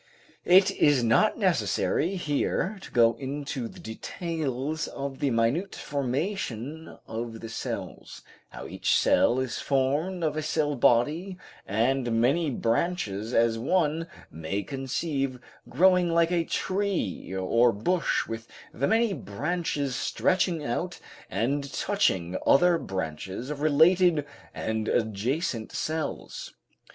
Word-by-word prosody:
It 190 Hz, +2 st, +6 dB
is 145 Hz, -9 st, +3 dB
not 115 Hz, 0 st, +3 dB
necessary 180 Hz, +5 st, +1 dB
here 180 Hz, +4 st, -1 dB
to -, -, -10 dB
go 115 Hz, -1 st, +5 dB
into 140 Hz, -2 st, -4 dB
the -, -, -13 dB
details 155 Hz, +4 st, -3 dB
of 135 Hz, -1 st, -6 dB
the 140 Hz, -, +1 dB
minute 120 Hz, +11 st, 0 dB
formation 145 Hz, -, -3 dB
of 115 Hz, 0 st, -5 dB
the 115 Hz, -, -7 dB
cells, 115 Hz, -, -6 dB, 0.3 s
how -, -, -9 dB
each -, -, 0 dB
cell 120 Hz, -, +3 dB
is 130 Hz, -1 st, -2 dB
formed 145 Hz, +7 st, 0 dB
of 155 Hz, -2 st, 0 dB
a 155 Hz, -, -1 dB
cell 150 Hz, -1 st, 0 dB
body 150 Hz, +11 st, +2 dB, 0.3 s
and 120 Hz, +2 st, +1 dB
many 145 Hz, +7 st, +2 dB
branches, 115 Hz, -, -1 dB
as 115 Hz, -1 st, +3 dB
one 165 Hz, +4 st, +1 dB, 0.2 s
may 80 Hz, +6 st, -3 dB
conceive, 135 Hz, 0 st, -2 dB, 0.3 s
growing 180 Hz, -1 st, +4 dB
like 170 Hz, 0 st, +3 dB
a 170 Hz, -2 st, +1 dB
tree 190 Hz, -, -2 dB
or 115 Hz, +6 st, +3 dB
bush 170 Hz, -, 0 dB
with 115 Hz, 0 st, -6 dB, 0.3 s
the 140 Hz, +4 st, 0 dB
many 225 Hz, -2 st, +2 dB
branches 145 Hz, -, -2 dB
stretching 175 Hz, -2 st, 0 dB
out 175 Hz, +9 st, -3 dB, 0.3 s
and 140 Hz, +4 st, -1 dB
touching 95 Hz, -, 0 dB
other 175 Hz, +4 st, +5 dB
branches 95 Hz, -, -5 dB
of 145 Hz, -1 st, -5 dB
related 160 Hz, +1 st, +4 dB, 0.3 s
and 110 Hz, -1 st, -3 dB
adjacent 115 Hz, -, -1 dB
cells. 160 Hz, -, -4 dB
140 Hz, 120 wpm, -27 LUFS, 115-170 Hz, 0.3 s, It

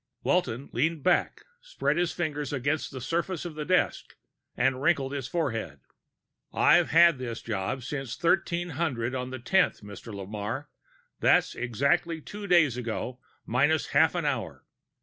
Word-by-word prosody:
Walton 125 Hz, +5 st, 0 dB
leaned 155 Hz, +4 st, 0 dB
back, 180 Hz, -, +1 dB, 0.2 s
spread 150 Hz, -, -1 dB
his 175 Hz, -1 st, +1 dB
fingers 150 Hz, -4 st, -3 dB
against 145 Hz, +3 st, -1 dB
the 135 Hz, -, -7 dB
surface 170 Hz, +6 st, -2 dB
of 170 Hz, -, -5 dB
the 150 Hz, 0 st, -5 dB
desk, 185 Hz, +2 st, 0 dB, 0.4 s
and 130 Hz, +1 st, +1 dB
wrinkled 140 Hz, -3 st, +2 dB
his 135 Hz, -3 st, -3 dB
forehead. 115 Hz, -, -2 dB, 0.7 s
"I've 175 Hz, +1 st, +4 dB
had 170 Hz, -4 st, +6 dB
this 120 Hz, -3 st, -4 dB
job 115 Hz, +4 st, -3 dB
since 135 Hz, -2 st, -5 dB
1300 170 Hz, -8 st, 0 dB
on 125 Hz, -1 st, -3 dB
the 130 Hz, -, -5 dB
tenth, 185 Hz, +10 st, +2 dB
Mr. 105 Hz, +3 st, -9 dB
Lamarre. 105 Hz, +7 st, -5 dB, 0.5 s
That's -, -, +3 dB
exactly 140 Hz, +8 st, 0 dB
two 205 Hz, +6 st, -8 dB
days 160 Hz, -9 st, +4 dB
ago, 125 Hz, +1 st, -4 dB, 0.3 s
minus 145 Hz, +6 st, +2 dB
half 155 Hz, +5 st, +4 dB
an 170 Hz, -3 st, -1 dB
hour. 135 Hz, -6 st, -3 dB
140 Hz, 145 wpm, -28 LUFS, 120-165 Hz, 0.7 s, had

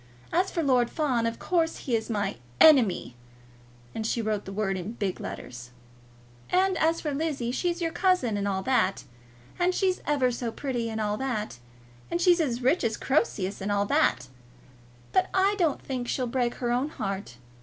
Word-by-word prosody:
As 365 Hz, +3 st, +2 dB
for 335 Hz, -, -2 dB
Lord 250 Hz, -4 st, +3 dB
Fawn, 255 Hz, -7 st, 0 dB
of 230 Hz, -, -3 dB
course 330 Hz, -2 st, -1 dB
he 245 Hz, -, +1 dB
is 220 Hz, 0 st, -2 dB
my 205 Hz, -3 st, -1 dB, 0.2 s
ENEMY!" 235 Hz, -, +5 dB, 0.8 s
And 220 Hz, -, -3 dB
she 230 Hz, +2 st, -1 dB
wrote 215 Hz, -2 st, -1 dB
the 195 Hz, -, -7 dB
word 195 Hz, -1 st, -1 dB
in 185 Hz, +4 st, -5 dB
big 200 Hz, -5 st, -3 dB
letters. 120 Hz, 0 st, -7 dB, 0.8 s
"And 375 Hz, +1 st, +3 dB
as 325 Hz, +1 st, +2 dB
for 300 Hz, -2 st, -3 dB
Lizzie, 275 Hz, -5 st, -2 dB
she's 345 Hz, +5 st, -1 dB
your 330 Hz, -, 0 dB
cousin, 355 Hz, -, +2 dB
and 200 Hz, 0 st, -1 dB
all 190 Hz, -1 st, -1 dB
that. 220 Hz, -6 st, +1 dB, 0.6 s
And 360 Hz, +1 st, +2 dB
she's 375 Hz, -2 st, +1 dB
ever 275 Hz, -4 st, +2 dB
so 235 Hz, -1 st, -3 dB
pretty, 240 Hz, -3 st, -3 dB
and 220 Hz, 0 st, -4 dB
all 210 Hz, -1 st, -1 dB
that. 215 Hz, -, -3 dB, 0.5 s
And 340 Hz, -, -1 dB
she's 350 Hz, 0 st, +4 dB
as 250 Hz, -5 st, -1 dB
rich 270 Hz, +7 st, +3 dB
as 225 Hz, -2 st, 0 dB
Croesus, 210 Hz, -9 st, 0 dB
and 200 Hz, +2 st, -2 dB
all 200 Hz, 0 st, +2 dB
that. 125 Hz, -10 st, +2 dB, 0.8 s
But -, -, +2 dB
I 385 Hz, +2 st, +4 dB
don't 325 Hz, -5 st, +1 dB
think 255 Hz, -3 st, -4 dB
she'll 255 Hz, -, -1 dB
break 240 Hz, 0 st, -1 dB
her 240 Hz, -2 st, -2 dB
own 255 Hz, +5 st, 0 dB
heart. 195 Hz, -, -5 dB
245 Hz, 185 wpm, -27 LUFS, 210-315 Hz, 0.8 s, ENEMY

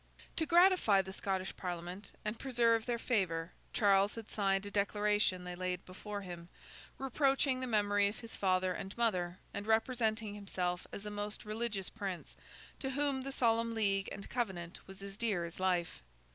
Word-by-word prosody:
To 320 Hz, -, +2 dB
gratify 340 Hz, -, +6 dB
the 190 Hz, 0 st, -7 dB
Scottish 190 Hz, -1 st, -2 dB
Parliament, 180 Hz, +2 st, -5 dB
and 215 Hz, +2 st, -2 dB
preserve 235 Hz, -3 st, +3 dB
their 240 Hz, -1 st, +1 dB
favour, 180 Hz, -9 st, 0 dB, 0.2 s
Charles 200 Hz, -2 st, +4 dB
had 225 Hz, -2 st, -8 dB
signed 195 Hz, -1 st, +1 dB
a 205 Hz, -, -5 dB
declaration 205 Hz, -2 st, +2 dB
they 180 Hz, 0 st, -5 dB
laid 180 Hz, 0 st, -3 dB
before 205 Hz, +2 st, -6 dB
him, 175 Hz, -2 st, -8 dB, 0.5 s
reproaching 270 Hz, 0 st, +2 dB
the 255 Hz, -, -3 dB
memory 205 Hz, -2 st, +3 dB
of 205 Hz, -, -5 dB
his 230 Hz, -1 st, -8 dB
father 185 Hz, -1 st, +2 dB
and 195 Hz, +3 st, -6 dB
mother, 185 Hz, -7 st, +1 dB, 0.2 s
and 200 Hz, +1 st, -4 dB
representing 225 Hz, -2 st, +1 dB
himself 185 Hz, -3 st, -2 dB
as 200 Hz, -, -6 dB
a 210 Hz, -, -4 dB
most 205 Hz, +1 st, -4 dB
religious 215 Hz, -3 st, -2 dB
Prince, 190 Hz, -3 st, -5 dB, 0.4 s
to 265 Hz, -, -2 dB
whom 275 Hz, 0 st, 0 dB
the 275 Hz, +1 st, -4 dB
Solemn 230 Hz, -3 st, +2 dB
League 195 Hz, -3 st, +2 dB
and 200 Hz, -, -7 dB
Covenant 190 Hz, -8 st, -3 dB
was 195 Hz, +1 st, -10 dB
as 200 Hz, 0 st, -7 dB
dear 205 Hz, -7 st, +1 dB
as 170 Hz, +1 st, -8 dB
life. 180 Hz, -, 0 dB
205 Hz, 170 wpm, -35 LUFS, 185-230 Hz, 0.5 s, gratify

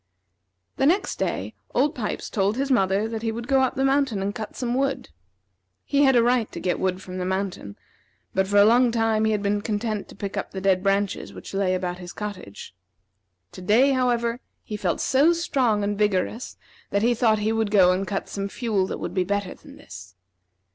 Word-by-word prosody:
The 270 Hz, -, +3 dB
next 380 Hz, +5 st, +1 dB
day, -, -, -2 dB, 0.2 s
Old 280 Hz, +5 st, +2 dB
Pipes 225 Hz, -8 st, -4 dB
told 200 Hz, +2 st, 0 dB
his 275 Hz, +1 st, -1 dB
mother 195 Hz, -2 st, +2 dB
that 225 Hz, -1 st, -5 dB
he 225 Hz, -1 st, -1 dB
would 235 Hz, +2 st, -6 dB
go 270 Hz, 0 st, +3 dB
up 260 Hz, -, +1 dB
the 270 Hz, -, +1 dB
mountain 270 Hz, -6 st, +1 dB
and 195 Hz, +1 st, -2 dB
cut 220 Hz, -2 st, -7 dB
some 245 Hz, -2 st, -2 dB
wood. 275 Hz, -, -1 dB, 0.8 s
He 285 Hz, 0 st, +3 dB
had 265 Hz, -1 st, +4 dB
a 235 Hz, -, +5 dB
right 240 Hz, -2 st, +1 dB
to -, -, -5 dB
get 180 Hz, -, -1 dB
wood 185 Hz, 0 st, -1 dB
from 185 Hz, 0 st, -7 dB
the -, -, -2 dB
mountain, 190 Hz, -, -3 dB, 0.6 s
but 190 Hz, 0 st, +1 dB
for 205 Hz, +1 st, +1 dB
a 200 Hz, -, +8 dB
long 240 Hz, +3 st, +5 dB
time 225 Hz, -1 st, +1 dB
he 220 Hz, -, +2 dB
had 210 Hz, -1 st, -1 dB
been 205 Hz, 0 st, 0 dB
content 215 Hz, -1 st, -3 dB
to -, -, -12 dB
pick 200 Hz, 0 st, -5 dB
up -, -, -3 dB
the 190 Hz, -, -6 dB
dead 190 Hz, -1 st, +2 dB
branches 195 Hz, 0 st, -1 dB
which -, -, -10 dB
lay 195 Hz, -1 st, +1 dB
about 180 Hz, -1 st, -3 dB
his 175 Hz, -1 st, -9 dB
cottage. 205 Hz, -, -7 dB, 0.8 s
To -, -, -10 dB
day, 230 Hz, +9 st, +4 dB
however, 240 Hz, -2 st, +1 dB, 0.2 s
he 215 Hz, -, -6 dB
felt 190 Hz, -4 st, -1 dB
so 285 Hz, +6 st, +4 dB
strong 255 Hz, -11 st, +1 dB
and 205 Hz, 0 st, -2 dB
vigorous 210 Hz, +3 st, -1 dB, 0.3 s
that 200 Hz, +1 st, 0 dB
he 240 Hz, +1 st, +4 dB
thought 225 Hz, -2 st, +2 dB
he 210 Hz, +1 st, 0 dB
would 225 Hz, -1 st, 0 dB
go 190 Hz, -3 st, +5 dB
and 185 Hz, +1 st, -1 dB
cut 195 Hz, -, -3 dB
some 200 Hz, 0 st, -4 dB
fuel 210 Hz, -5 st, -1 dB
that -, -, -4 dB
would -, -, -5 dB
be 185 Hz, -, +1 dB
better 200 Hz, 0 st, -2 dB
than -, -, -15 dB
this. 90 Hz, -, -12 dB
210 Hz, 215 wpm, -24 LUFS, 195-245 Hz, 0.8 s, a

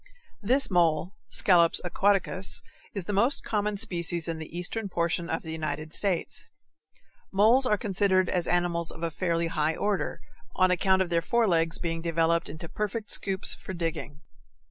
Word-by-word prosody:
This 255 Hz, +4 st, +3 dB
mole 170 Hz, -1 st, +2 dB, 0.2 s
(Scalops 170 Hz, -3 st, +4 dB
aquaticus) 195 Hz, 0 st, +1 dB, 0.3 s
is 195 Hz, -4 st, -3 dB
the 205 Hz, -, -3 dB
most 235 Hz, +8 st, +2 dB
common 210 Hz, -1 st, -1 dB
species 175 Hz, -5 st, +1 dB
in 165 Hz, -1 st, -3 dB
the 160 Hz, -, -8 dB
eastern 200 Hz, +4 st, -3 dB
portion 170 Hz, 0 st, -1 dB
of 165 Hz, -, -2 dB
the 160 Hz, -, -7 dB
United 155 Hz, 0 st, -4 dB
States. 190 Hz, -5 st, 0 dB, 0.8 s
Moles 225 Hz, +7 st, +4 dB
are 210 Hz, -, +2 dB
considered 190 Hz, -2 st, +1 dB
as 175 Hz, -1 st, 0 dB
animals 175 Hz, -1 st, 0 dB
of 165 Hz, -, -8 dB
a 165 Hz, -, -1 dB
fairly 170 Hz, 0 st, -1 dB
high 160 Hz, -1 st, -1 dB
order, 205 Hz, -1 st, -2 dB, 0.4 s
on 185 Hz, 0 st, +3 dB
account 190 Hz, +1 st, +3 dB
of 175 Hz, -, -9 dB
their 170 Hz, 0 st, +2 dB
forelegs' 170 Hz, -6 st, +1 dB
being 165 Hz, -1 st, -3 dB
developed 165 Hz, 0 st, +1 dB
into 160 Hz, +3 st, -7 dB
perfect 210 Hz, +3 st, -4 dB
scoops 195 Hz, 0 st, +1 dB
for 190 Hz, -, -8 dB
digging. 165 Hz, -3 st, -4 dB
175 Hz, 160 wpm, -27 LUFS, 165-200 Hz, 0.8 s, Scalops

